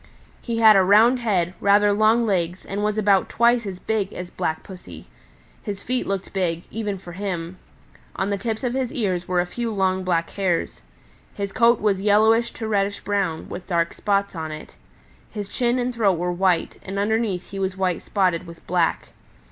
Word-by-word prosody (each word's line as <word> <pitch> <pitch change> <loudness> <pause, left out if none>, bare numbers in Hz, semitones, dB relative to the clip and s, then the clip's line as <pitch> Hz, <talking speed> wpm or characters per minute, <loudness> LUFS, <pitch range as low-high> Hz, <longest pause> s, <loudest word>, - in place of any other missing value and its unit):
He 235 -2 -3
had 220 -2 +7
a 195 - +6
round 220 +6 +5
head, 185 -7 0
rather 205 +1 +4
long 220 +3 +3
legs, 180 -3 -1
and 200 +1 -3
was 210 0 0
about 200 -3 +3
twice 235 -1 +2
as 190 -2 -5
big 205 0 -2
as 180 0 -7
Black 160 0 -3
Pussy. 90 - -11 0.6
His 200 -1 -6
feet 255 0 -2
looked 195 -1 -3
big, 175 -3 -1
even 210 -3 -3
for 180 -1 -11
him. 180 -2 -5 0.6
On 195 +1 -1
the 200 - 0
tips 220 +2 -3
of 245 -1 -1
his 260 -2 -1
ears 185 -7 -2
were 180 -1 +1
a 175 - +2
few 230 +6 -4
long 190 -2 0
black 170 -2 0
hairs. 185 -4 -1 0.5
His 200 -1 -4
coat 235 0 +4
was 200 -3 +1
yellowish 220 +3 +4
to 220 - -5
reddish 200 -1 0
brown, 195 -6 -2
with 175 - -8
dark 170 -2 0
spots 200 -1 -1
on 160 -1 -4
it. 155 0 -9 0.6
His 205 -3 -6
chin 240 +3 0
and 250 0 -1
throat 205 -6 +2
were 175 +1 -1
white, 180 -2 0
and 195 +1 -6
underneath 205 -3 -1
he 195 - -5
was 190 -1 -2
white 185 -2 0
spotted 180 -3 0
with 170 0 -13
black. 175 -2 0
195 Hz, 190 wpm, -23 LUFS, 180-220 Hz, 0.6 s, had